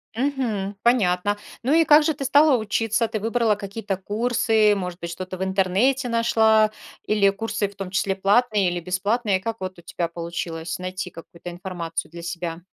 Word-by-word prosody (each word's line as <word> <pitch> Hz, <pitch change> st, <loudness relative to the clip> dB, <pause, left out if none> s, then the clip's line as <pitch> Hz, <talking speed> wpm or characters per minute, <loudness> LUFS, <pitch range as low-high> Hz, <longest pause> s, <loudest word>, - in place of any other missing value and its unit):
Мгм. 235 Hz, -7 st, -1 dB
Понятно. 205 Hz, -4 st, +2 dB, 0.3 s
Ну, 270 Hz, +5 st, +2 dB
и 330 Hz, 0 st, +6 dB
как 300 Hz, 0 st, +7 dB
же 315 Hz, -, +1 dB
ты 275 Hz, -1 st, -5 dB
стала 285 Hz, 0 st, +5 dB
учиться? 225 Hz, +1 st, 0 dB
Ты 215 Hz, -, -3 dB
выбрала 225 Hz, 0 st, +1 dB
какие-то 200 Hz, 0 st, -4 dB
курсы, 220 Hz, +1 st, +2 dB
может 180 Hz, -2 st, -5 dB
быть, 170 Hz, 0 st, -5 dB
что-то 185 Hz, +1 st, -6 dB
в 190 Hz, -, -2 dB
интернете 200 Hz, +8 st, +1 dB
нашла? 220 Hz, -2 st, +3 dB, 0.3 s
Или 205 Hz, -2 st, +3 dB
курсы, 205 Hz, 0 st, -2 dB
в 200 Hz, -, -15 dB
том 195 Hz, -2 st, -6 dB
числе 195 Hz, 0 st, 0 dB
платные 205 Hz, 0 st, +2 dB
или 175 Hz, 0 st, -2 dB
бесплатные? 195 Hz, +3 st, 0 dB
Как 225 Hz, +3 st, -4 dB
вот 185 Hz, -1 st, -5 dB
у -, -, -13 dB
тебя 170 Hz, 0 st, -3 dB
получилось 170 Hz, 0 st, -5 dB
найти 185 Hz, 0 st, -4 dB
какую-то 170 Hz, +1 st, -10 dB
информацию 175 Hz, -3 st, -5 dB
для 170 Hz, 0 st, -9 dB
себя? 170 Hz, -1 st, -5 dB
200 Hz, 175 wpm, -23 LUFS, 180-230 Hz, 0.3 s, как